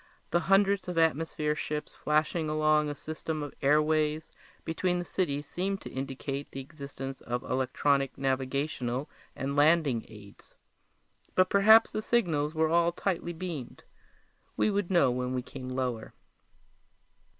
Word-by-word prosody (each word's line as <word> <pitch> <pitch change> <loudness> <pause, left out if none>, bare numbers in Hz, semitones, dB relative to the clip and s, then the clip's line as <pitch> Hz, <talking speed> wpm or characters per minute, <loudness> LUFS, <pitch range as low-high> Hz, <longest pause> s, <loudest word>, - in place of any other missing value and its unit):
The 175 - +3
hundreds 195 +1 +3
of 180 -2 -4
atmosphere 160 -1 +1
ships 150 0 -4
flashing 155 +1 0
along 155 0 +2
a 145 - -4
system 155 0 -5
of 145 - -7
airways 155 +2 +2 0.3
between 180 +2 0
the 175 - -3
cities 145 -7 -1
seemed 195 +5 -2
to - - -8
indicate 135 +1 -4
the 135 - -7
existence 135 -1 -8
of 125 0 -3
electronic 135 +1 0
navigational 135 0 -2 0.2
and 140 +1 -3
landing 145 -5 +3
aids. 105 -2 -15 0.8
But 185 0 +3
perhaps 220 +3 +7
the 215 - -2
signals 165 -11 +1
were 160 0 +3
all 170 +1 +3
tightly 175 -1 -2
beamed; 165 -6 -6 0.7
we 215 - +2
would 200 -3 -1
know 175 -9 +4
when 125 +1 -2
we 125 - -2
came 130 0 -8
lower. 125 -3 -3
150 Hz, 140 wpm, -29 LUFS, 135-170 Hz, 0.8 s, perhaps